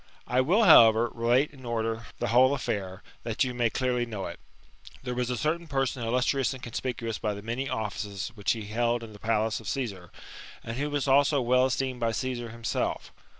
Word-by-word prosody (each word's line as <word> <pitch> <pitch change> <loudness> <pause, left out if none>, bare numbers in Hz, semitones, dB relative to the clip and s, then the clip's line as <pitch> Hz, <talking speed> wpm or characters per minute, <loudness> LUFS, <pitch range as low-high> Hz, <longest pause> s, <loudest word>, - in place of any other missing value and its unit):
I 125 +1 +2
will, 185 - +3
however, 115 - +7
relate 120 +5 +2
in 135 -3 -15
order 115 -1 -2
the - - -2
whole 130 +4 +5
affair, 100 -7 -4 0.2
that 115 +1 0
you 125 -1 -2
may 120 -1 +1
clearly 125 0 0
know 110 -5 -5
it. 85 - -7 0.3
" 70 - -19
There 125 -1 -3
was 125 0 -2
a 125 - -1
certain 160 +7 -1
person 135 -3 -1
illustrious 125 +3 +1
and 130 - -12
conspicuous 115 -1 -4
by 105 -1 -2
the 100 - -9
many 125 +4 -3
offices* 105 -2 -4
which 105 -3 0
he 110 -3 -6
held 120 +2 0
in 110 -2 -10
the 105 - -13
palace 110 0 0
of 110 - -11
Csssar, 100 -10 -4 0.5
and 115 +1 -5
who 145 +2 -1
was 145 -1 -1
also 140 +1 +4
well 125 +1 +3
esteemed 130 -1 -2
by 115 -1 0
Caesar 125 -2 -3
himself. 115 0 -3
120 Hz, 200 wpm, -28 LUFS, 110-130 Hz, 0.5 s, however